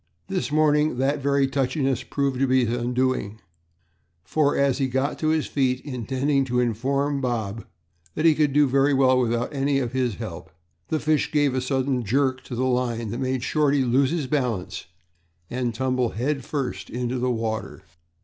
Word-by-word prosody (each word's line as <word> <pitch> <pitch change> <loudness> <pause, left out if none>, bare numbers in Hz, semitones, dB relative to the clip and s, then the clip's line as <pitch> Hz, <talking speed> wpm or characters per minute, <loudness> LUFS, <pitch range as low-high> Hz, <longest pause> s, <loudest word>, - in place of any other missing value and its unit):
This 185 -5 -2
morning 150 -2 +3
that 140 +3 +1
very 140 0 +2
touchiness 135 -1 0
proved 140 -2 -2
to 135 - +2
be 130 -1 +3
his 115 +1 -1
undoing, 125 -3 -1 0.8
for, 150 +4 +1
as 140 -1 +2
he 135 - +1
got 130 +3 -1
to 155 - 0
his 155 -1 +2
feet, 130 -3 0
intending 135 +2 -1
to 125 -1 0
inform 135 +4 0
Bob 115 -4 -3 0.5
that 155 - -1
he 160 - +7
could 150 -1 +2
do 145 +1 +4
very 135 +2 +3
well 130 -1 +4
without 120 +2 0
any 140 0 +1
of 125 -4 -1
his 125 -4 0
help, 90 -7 -7 0.4
the 155 - -1
fish 155 0 +1
gave 145 -3 +2
a 130 - 0
sudden 130 -1 0
jerk 130 +4 +1
to 125 - -6
the 130 +2 0
line 120 -4 -1
that 120 - -4
made 130 -1 -1
Shorty 145 -1 +2
lose 130 +2 +2
his 160 -2 -1
balance 125 -9 -2 0.6
and 125 -1 -1
tumble 125 0 0
head 135 +5 -2
first 120 -11 -4
into 125 +1 -2
the 125 +1 0
water. 110 -2 -3
130 Hz, 180 wpm, -24 LUFS, 125-140 Hz, 0.8 s, he